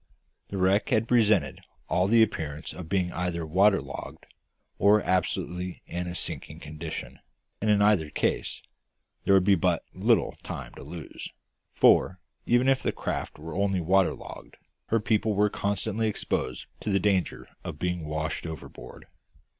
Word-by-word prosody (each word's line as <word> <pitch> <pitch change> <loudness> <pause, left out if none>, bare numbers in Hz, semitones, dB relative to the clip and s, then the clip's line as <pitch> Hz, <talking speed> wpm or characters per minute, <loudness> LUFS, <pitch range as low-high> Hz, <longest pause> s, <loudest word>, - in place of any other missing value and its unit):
The 100 - -5
wreck 95 +2 +2
had 110 +1 +2
presented 105 - +3 0.3
all 90 +1 +2
the 115 +2 +6
appearance 80 -7 -3
of 90 -3 -8
being 90 -2 0
either 85 -1 -2
waterlogged, 95 +5 +1 0.5
or 105 +2 +6
absolutely 90 0 -1
in 90 +1 -4
a 85 - -5
sinking 80 -2 -5
condition; 80 +1 -7 0.4
and 110 - +1
in 105 -1 +4
either 100 -7 +3
case - - -1 0.6
there 100 - +5
would 95 - +5
be 100 +1 +5
but 90 - +1
little - - +2
time - - -7
to - - -11
lose; - - -8 0.5
for, 95 - +4 0.3
even 120 +2 +4
if 135 -1 +3
the - - 0
craft - - -4
were 80 +1 -8
only 100 0 +1
waterlogged, 95 +2 0 0.3
her 115 - +2
people 110 0 +1
were 105 +1 +3
constantly 105 +2 -1
exposed 65 - -2
to - - -4
the 100 -1 +3
danger 95 -4 0 0.2
of - - -6
being 90 0 -2
washed 80 +2 -3
overboard. 70 -5 -9
95 Hz, 150 wpm, -27 LUFS, 85-105 Hz, 0.6 s, the